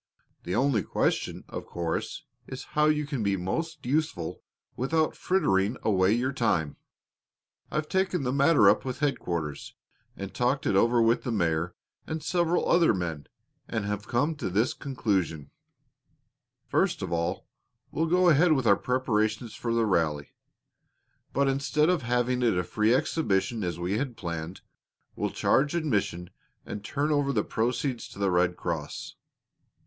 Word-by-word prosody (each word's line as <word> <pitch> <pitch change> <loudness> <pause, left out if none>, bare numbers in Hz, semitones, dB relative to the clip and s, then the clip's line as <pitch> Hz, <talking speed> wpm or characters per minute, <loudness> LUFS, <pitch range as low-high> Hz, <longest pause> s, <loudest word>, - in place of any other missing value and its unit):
"The 90 - -2
only 125 -3 +2
question, - - -1
of - - -7
course, 85 -1 -3 0.2
is 130 - -7
how 150 0 +4
you 150 -1 +2
can 140 -4 -3
be 100 -2 +1
most 155 - -3
useful 140 - -1 0.3
without 155 +5 0
frittering 120 - +1
away 95 -3 +3
your 125 +4 +1
time. 85 - 0 0.9
I've 155 0 -2
taken 190 -3 0
the 125 0 -1
matter 140 +3 +5
up - - +5
with 130 -1 -4
headquarters, 85 - -2 0.4
and 100 -1 -6
talked 125 +3 0
it - - +2
over 115 +3 +4
with 115 +1 +3
the 125 - -3
mayor 85 -4 0 0.3
and 160 -1 -4
several 175 +1 +1
other 170 - +4
men, 85 -5 -4 0.4
and 110 -2 -2
have 105 0 -3
come 145 +7 +1
to - - -3
this 110 +7 +1
conclusion: 95 - -2 1.2
first - - +1
of - - -4
all, 85 0 -1 0.5
we'll 160 +2 0
go 180 +2 +3
ahead 165 +1 +5
with 135 -4 0
our 100 -3 +5
preparations 110 -3 0
for 120 - -3
the 115 -1 +2
rally, 80 -7 0 1.0
but 140 0 +1
instead 140 +3 +2
of 180 -4 +2
having 125 +1 0
it 115 -7 +2
a 90 - +1
free 105 +5 +1
exhibition, 115 - 0
as 85 -2 -2
we 95 +8 -1
planned, 85 - -6 0.5
we'll - - -1
charge 145 +4 +2
admission 100 - -1 0.3
and 100 - -6
turn 145 +7 -1
over 145 -2 +2
the - - +1
proceeds 125 +2 -1
to - - -14
the 100 -1 +1
Red 90 0 +2
Cross. 80 -5 -4
120 Hz, 155 wpm, -27 LUFS, 95-145 Hz, 1.2 s, matter